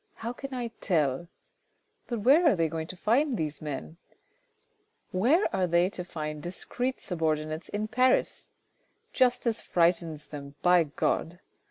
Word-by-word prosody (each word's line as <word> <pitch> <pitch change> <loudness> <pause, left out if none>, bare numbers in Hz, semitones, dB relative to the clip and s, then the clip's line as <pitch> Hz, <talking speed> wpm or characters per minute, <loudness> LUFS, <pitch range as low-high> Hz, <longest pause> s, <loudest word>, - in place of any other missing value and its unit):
How 230 +2 -5
can 275 +2 -8
I 245 -2 -3
tell? 155 -3 +1 0.8
But 235 -3 -3
where 295 - +6
are 295 - +5
they 165 -2 +1
going 160 0 -4
to 185 - -8
find 245 +6 +2
these 155 -2 -3
men? 155 +2 -6 1.1
Where 255 - +3
are 185 -1 +1
they 175 +2 +3
to 180 - -5
find 155 -3 -5
discreet 245 - -3
subordinates 155 -2 -2
in 210 +1 -2
Paris? 255 +4 +1 0.6
Justice 245 -2 +2
frightens 165 -3 +1
them 140 -1 -8
By 180 -2 +5
God 165 +3 -1
180 Hz, 140 wpm, -28 LUFS, 155-240 Hz, 1.1 s, where